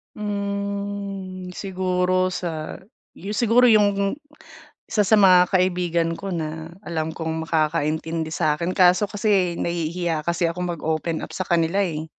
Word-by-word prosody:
Hmm, 200 Hz, -2 st, -4 dB
siguro 185 Hz, -1 st, 0 dB
sayo 185 Hz, +4 st, -7 dB
siguro 235 Hz, +3 st, +4 dB
yung 205 Hz, -3 st, +4 dB, 0.7 s
isa 215 Hz, -, -1 dB
sa 210 Hz, +2 st, +4 dB
mga 185 Hz, -3 st, +6 dB
kaibigan 175 Hz, -2 st, +1 dB
ko 195 Hz, -, -5 dB
na 160 Hz, -2 st, -4 dB, 0.2 s
alam 160 Hz, -1 st, -3 dB
kong 160 Hz, 0 st, -3 dB
makakaintindi 160 Hz, 0 st, 0 dB
sa'kin, 160 Hz, +2 st, -1 dB
kaso 185 Hz, +3 st, +5 dB
kasi 200 Hz, -5 st, +1 dB
nahihiya 170 Hz, -1 st, -2 dB
kasi 170 Hz, +2 st, -1 dB
akong 175 Hz, +2 st, -1 dB
mag-open 160 Hz, 0 st, -2 dB
up -, -, -11 dB
sa 185 Hz, -, -4 dB
kanila, 170 Hz, +3 st, +2 dB
eh. 160 Hz, -5 st, -1 dB
180 Hz, 125 wpm, -23 LUFS, 165-200 Hz, 0.7 s, mga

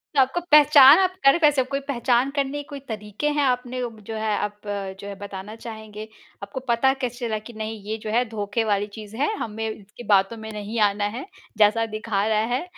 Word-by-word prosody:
तो 275 Hz, -, +4 dB
आपको 265 Hz, +7 st, +1 dB
पहचान 295 Hz, 0 st, +8 dB
आप 370 Hz, -1 st, +2 dB
कर 275 Hz, +4 st, +7 dB
वैसे 290 Hz, -3 st, +5 dB
कोई 275 Hz, -, -1 dB
पहचान 250 Hz, 0 st, +1 dB
करने 280 Hz, 0 st, -2 dB
के -, -, -25 dB
कोई 285 Hz, -, -7 dB
तरीके 210 Hz, +4 st, -4 dB
हैं 290 Hz, -, +3 dB
आपने 250 Hz, -1 st, -1 dB, 0.3 s
जो 225 Hz, -, -5 dB
है, 215 Hz, -1 st, -1 dB
आप 210 Hz, 0 st, -4 dB
जो 200 Hz, -1 st, -5 dB
है 200 Hz, -, -6 dB
बताना 200 Hz, +1 st, -8 dB
चाहेंगे? 220 Hz, -2 st, -9 dB, 0.4 s
आपको 200 Hz, +6 st, -5 dB
पता 240 Hz, +3 st, +3 dB
कैसे 245 Hz, -1 st, -3 dB
चला 215 Hz, -1 st, -2 dB
कि 220 Hz, +3 st, -12 dB
नहीं, 220 Hz, -1 st, -6 dB
ये 215 Hz, +2 st, -4 dB
जो 215 Hz, -, -4 dB
है 240 Hz, +2 st, +3 dB
धोखे 210 Hz, +1 st, -2 dB
वाली 205 Hz, -1 st, 0 dB
चीज़ 215 Hz, 0 st, -9 dB
है 295 Hz, -, +1 dB
हमें 220 Hz, 0 st, -4 dB
इसकी 215 Hz, +2 st, -10 dB
बातों 195 Hz, +4 st, +3 dB
में 220 Hz, 0 st, -8 dB
नहीं 210 Hz, +2 st, -5 dB
आना 205 Hz, +1 st, -2 dB
है, 265 Hz, -, -6 dB, 0.3 s
जैसा 215 Hz, +2 st, +4 dB
दिखा 215 Hz, -2 st, -1 dB
रहा 215 Hz, -1 st, +2 dB
है 260 Hz, -, -2 dB
220 Hz, 210 wpm, -23 LUFS, 210-255 Hz, 0.4 s, पहचान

